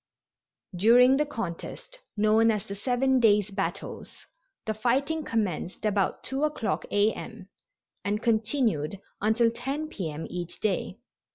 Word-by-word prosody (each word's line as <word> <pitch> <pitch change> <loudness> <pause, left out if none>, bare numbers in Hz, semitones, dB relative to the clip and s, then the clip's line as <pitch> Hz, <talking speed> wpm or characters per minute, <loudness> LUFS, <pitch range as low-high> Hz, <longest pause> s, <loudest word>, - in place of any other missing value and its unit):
During 245 +7 +6
the 300 0 +1
contest 230 - -6 0.2
known 215 +2 +4
as 210 -3 0
the 200 - -6
"seven 255 +5 +1
days' 210 -3 +4
battles" 195 0 -5 0.4
the 220 - -1
fighting 270 +8 0
commenced 205 - -2
about 200 -3 0
2 270 +1 -3
o'clock 300 -7 -1
A. 205 +2 +3
M., 220 -5 -9 0.5
and 205 +1 0
continued 220 - 0 0.2
until 225 +2 +3
10 275 +6 -4
P. 185 - -4
M. 150 +2 -6
each 175 -1 -6
day. 200 -2 -1
220 Hz, 130 wpm, -27 LUFS, 200-250 Hz, 0.5 s, During